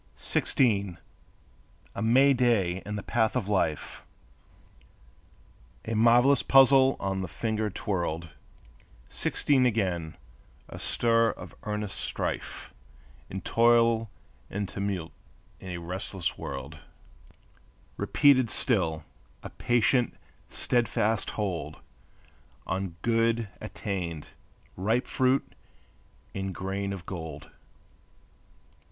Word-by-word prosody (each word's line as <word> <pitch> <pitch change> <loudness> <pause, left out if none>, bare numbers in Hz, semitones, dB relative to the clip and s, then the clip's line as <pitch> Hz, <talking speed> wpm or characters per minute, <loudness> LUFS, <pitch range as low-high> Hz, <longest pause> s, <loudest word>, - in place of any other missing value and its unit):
Sixteen! 100 -8 +1 1.0
A - - -5
May 130 +5 +5
day 105 -8 +2
in 105 - -3
the 100 - -4
path 110 -1 +1
of 120 -6 -1
life, 90 -7 -1 1.8
A 115 - -3
marvelous 120 +5 +5
puzzle 135 0 +6
on 95 -1 -2
the 95 - -3
finger 110 +4 -2
twirled; 85 -4 -3 0.8
Sixteen 135 -3 +1
again; 90 - -1 0.5
a - - -9
stir 115 -1 +2
of - - -8
earnest 105 -2 -3
strife - - -4 0.6
And 95 -1 -6
toil 115 -1 +4 0.4
and 100 0 -3
tumult 95 -4 -3 0.5
in 95 - -9
a 90 - -4
restless 90 +1 -3
world; - - -7 1.2
Repeated 130 -5 +4
still, 85 - 0 0.4
a - - -7
patient, 120 +1 +1 0.3
steadfast 115 -3 0
hold 85 -8 -3 0.9
On 95 -2 -3
good 115 -1 +1
attained, 85 -6 -4 0.5
ripe 110 +7 0
fruit, 130 +1 +1 0.8
and 95 -2 -4
grain 95 +2 -3
of 95 -3 -6
gold. 80 -5 -7
105 Hz, 95 wpm, -28 LUFS, 95-115 Hz, 1.8 s, puzzle